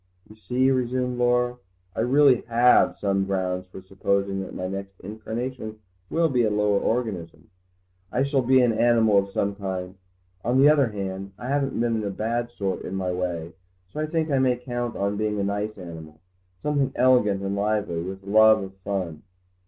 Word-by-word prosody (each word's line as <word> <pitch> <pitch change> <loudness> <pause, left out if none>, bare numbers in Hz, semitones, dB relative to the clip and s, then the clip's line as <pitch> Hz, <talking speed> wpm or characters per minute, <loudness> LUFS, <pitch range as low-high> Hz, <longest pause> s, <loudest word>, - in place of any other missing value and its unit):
"You 110 - -15
see," 125 +4 +1
resumed 125 -1 -1
Laura, 125 0 +2 0.4
"I - - -4
really 130 +2 +4
have 120 +1 +4
some 100 -1 0
grounds 90 -1 -2
for 95 0 -11
supposing 95 0 -1
that 95 - -8
my 90 - -3
next 95 0 -7
incarnation 110 +2 -5 0.3
will 165 0 +2
be 130 -5 +1
in 110 -3 +1
a - - -1
lower 105 -1 +2
organism. 90 -9 -3 0.6
I 130 - +1
shall 140 -1 +1
be 130 +1 +4
an 120 -2 +3
animal 110 -2 +4
of 100 0 -3
some 100 +1 -1
kind. 95 -2 -5 0.5
On 125 +3 +2
the 140 +2 +7
other 145 -4 +4
hand, 100 -2 -5
I 125 - -6
haven't 140 -2 0
been 115 -2 0
a 100 - -2
bad 115 +4 -2
sort 100 -5 -3
in 95 - -5
my 95 -1 -1
way, 85 -2 -3 0.4
so - - -5
I 155 - -1
think 160 -1 -1
I 135 - +3
may 130 -1 +3
count 120 -1 -4
on 100 +1 -1
being 105 -1 -1
a - - 0
nice 105 +2 -2
animal, 80 -4 -10 0.4
something 140 -3 +1
elegant 120 -6 +3
and 100 0 -2
lively, 100 -4 -1
with 95 +2 -7
a - - -18
love 110 +1 +5
of 95 0 -8
fun. 95 -5 -4
105 Hz, 190 wpm, -25 LUFS, 95-125 Hz, 0.6 s, the